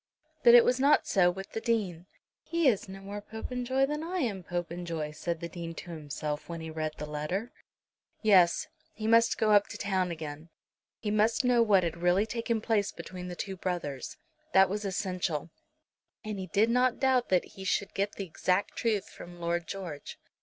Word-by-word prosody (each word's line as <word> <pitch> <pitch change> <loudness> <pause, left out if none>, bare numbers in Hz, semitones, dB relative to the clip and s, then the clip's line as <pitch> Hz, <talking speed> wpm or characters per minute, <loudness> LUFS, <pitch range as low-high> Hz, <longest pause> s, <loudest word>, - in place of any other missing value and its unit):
But 235 0 +8
it 240 - +8
was 250 +1 +2
not 285 +3 +4
so 180 -2 +4
with 195 +2 -6
the 225 - -4
Dean. 190 -7 -1 0.3
"He 335 -3 +1
is 210 -6 +2
no 195 0 -8
more 200 +1 -6
Popenjoy 250 +5 -1
than 300 +2 -3
I 355 +3 -3
am 225 - -1
Popenjoy," 170 -3 -4
said 165 +2 -4
the 170 - -3
Dean 170 -1 -7
to 175 - -8
himself 150 -1 -5
when 170 -1 -4
he 160 0 -6
read 155 -1 -3
the 150 - -4
letter. 150 +10 -3 0.7
Yes; 185 -5 +5 0.3
he 215 - -5
must 230 +1 +4
go 215 -1 +2
up 205 -1 +5
to - - -8
town 190 -2 0
again. 155 -1 -7 0.5
He 210 - -3
must 215 +4 +2
know 245 -1 +4
what 200 -5 +4
had 170 0 -2
really 180 +4 +3
taken 230 0 -2
place 215 -3 +1
between 180 -1 -8
the 180 - -6
two 195 +1 -4
brothers. 170 -8 -4 0.4
That 190 0 +6
was 210 +1 -2
essential, 180 -5 -2 0.7
and 210 -2 -4
he 185 - -5
did 210 +6 +2
not 250 0 +3
doubt 260 -2 +2
but 185 -2 +3
that - - -15
he 190 - -10
should 200 +1 -1
get 200 +1 -1
the 195 - -5
exact 185 +3 0
truth 215 -4 0
from 175 0 -11
Lord 170 0 -1
George. 175 -7 -6
190 Hz, 195 wpm, -30 LUFS, 170-220 Hz, 0.7 s, But